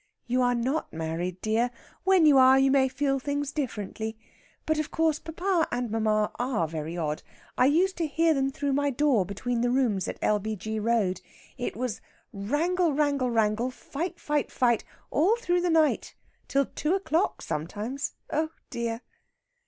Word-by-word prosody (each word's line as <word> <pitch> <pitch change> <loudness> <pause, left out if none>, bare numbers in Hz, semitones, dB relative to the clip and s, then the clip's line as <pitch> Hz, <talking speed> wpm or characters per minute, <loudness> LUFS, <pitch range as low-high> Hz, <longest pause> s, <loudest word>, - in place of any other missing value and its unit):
"You 250 +1 +1
are 245 0 +3
not 260 +7 -1
married, 165 +3 -3
dear. 225 +3 +1 0.4
When 380 -4 +5
you 285 -3 +7
are, 260 +1 +7
you 270 0 +4
may 265 -1 +4
feel 275 +1 0
things 285 +1 -2
differently. 220 -5 -4 0.5
But, 315 0 +1
of 310 - -2
course, 320 -2 +1
papa 340 +1 0
and 245 -2 -2
mamma 215 -1 +1
are 245 -9 0
very 160 +2 -5
odd. 155 -2 -2 0.3
I 250 - +4
used 360 +7 +2
to 335 -2 0
hear 325 +2 +3
them 270 -2 +1
through 280 0 -2
my 285 +1 +2
door 265 -8 +2
between 230 +4 -2
the 245 - +2
rooms 240 -7 +1
at - - -4
L.B.G. 215 +1 -1
Road. 210 -4 +1 0.3
It 245 - -4
was 245 -2 -3 0.3
wrangle, 310 - +1
wrangle, 280 -3 +1
wrangle; 225 +1 +1
fight, 325 +7 -5
fight, 295 -1 -1
fight; 240 -3 +2 0.3
all 360 +10 +3
through 355 -7 0
the 355 - +1
night 320 -2 +2 0.3
till 275 0 +2
two 310 +8 -1
o'clock 375 -2 0
sometimes. 215 - -4 0.2
Oh 315 +1 +1 0.2
dear!" 230 0 -3
260 Hz, 165 wpm, -27 LUFS, 220-300 Hz, 0.5 s, you